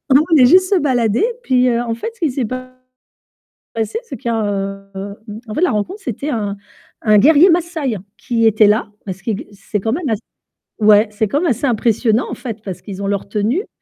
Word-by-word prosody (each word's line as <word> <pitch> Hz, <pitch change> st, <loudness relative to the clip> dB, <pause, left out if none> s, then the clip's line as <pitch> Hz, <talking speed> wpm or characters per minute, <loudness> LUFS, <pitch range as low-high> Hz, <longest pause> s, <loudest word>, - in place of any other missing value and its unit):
nous 290 Hz, -, +7 dB
on 325 Hz, -, +4 dB
venait 255 Hz, -4 st, +7 dB
juste 370 Hz, +4 st, +5 dB
se -, -, +5 dB
balader, 245 Hz, -, +1 dB, 0.2 s
puis, 255 Hz, -1 st, +3 dB
heu, 235 Hz, 0 st, +1 dB
en 230 Hz, -1 st, -2 dB
fait 345 Hz, -, -4 dB
ce -, -, -26 dB
qui 315 Hz, -, +2 dB
s'est 255 Hz, -2 st, -2 dB
passé, 255 Hz, +2 st, -5 dB, 1.4 s
c'est 275 Hz, -, -7 dB
qu'il 235 Hz, +2 st, -4 dB
y -, -, +1 dB
a, 220 Hz, -, 0 dB, 0.5 s
heu, 200 Hz, +1 st, -5 dB, 0.3 s
en 215 Hz, -, -5 dB
fait, -, -, -1 dB
la 365 Hz, -, +4 dB
rencontre, 355 Hz, -, -3 dB
c'était 275 Hz, +5 st, -4 dB
un 205 Hz, -4 st, -2 dB, 0.5 s
un 215 Hz, -2 st, +5 dB
guerrier 315 Hz, -, +6 dB
Massaï 325 Hz, -, 0 dB, 0.2 s
qui 230 Hz, -2 st, 0 dB
était 215 Hz, -1 st, +5 dB
là, 215 Hz, 0 st, +1 dB, 0.2 s
parce 190 Hz, 0 st, -6 dB
qu'il 220 Hz, -4 st, -1 dB
g -, -, -10 dB
c'est 200 Hz, +1 st, -4 dB
quand 225 Hz, +3 st, -1 dB
même 305 Hz, -1 st, -2 dB
as 220 Hz, -, +1 dB, 0.7 s
ouais, 210 Hz, +1 st, +6 dB
c'est 210 Hz, 0 st, -1 dB
quand 290 Hz, +8 st, 0 dB
même 350 Hz, -, +1 dB
assez 250 Hz, +4 st, 0 dB
impressionnant 230 Hz, 0 st, +1 dB
en -, -, -3 dB
fait, 230 Hz, -4 st, -6 dB
parce 190 Hz, -3 st, -6 dB
qu'ils 200 Hz, -1 st, -7 dB
ont -, -, -1 dB
leur 200 Hz, -1 st, -2 dB
tenue. 230 Hz, -, -1 dB
235 Hz, 220 wpm, -18 LUFS, 210-285 Hz, 1.4 s, nous